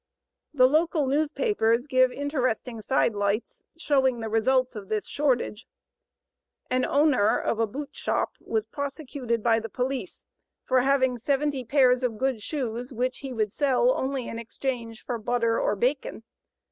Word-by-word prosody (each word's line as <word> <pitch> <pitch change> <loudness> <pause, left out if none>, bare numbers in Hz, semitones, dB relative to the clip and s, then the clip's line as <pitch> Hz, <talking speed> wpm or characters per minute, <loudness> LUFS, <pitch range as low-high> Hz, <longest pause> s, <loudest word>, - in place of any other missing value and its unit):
The 255 -4 +5
local 310 +1 +2
newspapers 280 - +1
give 255 -2 +3
interesting 255 -5 -2
side 235 +1 +1
lights 205 +2 -2
showing 265 -6 +2
the 225 -1 -4
results 255 +3 +2
of 200 -3 -8
this 215 -1 -1
shortage. 255 -6 -1 1.0
An 255 0 +2
owner 280 -8 +3
of 225 - -1
a 225 - +2
boot 280 +6 -6
shop - - -1
was 220 -1 -2
prosecuted 270 -3 -4
by 230 -1 +3
the 225 0 -7
police 260 - -4 0.4
for 255 -1 +3
having 260 -2 +2
70 275 +1 0
pairs 255 0 +4
of 240 -4 -1
good 260 -2 -1
shoes 245 -1 -4
which 255 +1 -2
he 270 -2 -6
would 215 -4 -1
sell 290 - +2
only 265 - -2
in 230 - -5
exchange 235 -1 -5
for 240 -2 -3
butter 230 0 +1
or 210 - +1
bacon. 250 +1 -1
255 Hz, 150 wpm, -26 LUFS, 230-275 Hz, 1.0 s, The